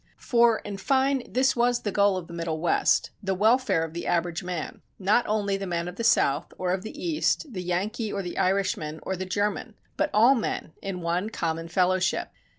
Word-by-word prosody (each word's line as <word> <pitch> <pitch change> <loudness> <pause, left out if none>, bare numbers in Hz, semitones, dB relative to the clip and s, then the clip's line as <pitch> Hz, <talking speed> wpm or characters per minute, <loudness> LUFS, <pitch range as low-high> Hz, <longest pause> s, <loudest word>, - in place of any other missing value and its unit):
For, 235 -2 +3
in 205 -1 -6
fine 265 +3 +1
this 260 +1 +2
was 240 0 +2
the 205 - -1
goal 200 -1 +3
of 180 - -5
the 170 - -11
Middle 165 -2 -3
West, 170 +1 +2
the 190 -2 -1
welfare 220 -2 +3
of 165 -1 -6
the 170 - -5
average 170 0 0
man; 180 -3 -5 0.2
not 205 +5 +2
only 205 -2 0
the 195 0 -5
man 170 -1 -2
of 180 - -6
the 230 - -3
South, 145 -11 +2
or 180 -1 -1
of 185 - -2
the 220 +9 -8
East, 315 -4 0
the 185 - -4
Yankee, 205 +5 -2
or 195 - -3
the 175 - -5
Irishman, 180 -5 0
or 190 - -2
the 185 +1 -4
German, 205 +3 -2 0.2
but - - +1
all 230 +5 +6
men 220 -9 -3
in 190 -2 -4
one 175 +5 -1
common 165 -5 -3
fellowship. 185 +1 +1
195 Hz, 205 wpm, -26 LUFS, 175-225 Hz, 0.2 s, all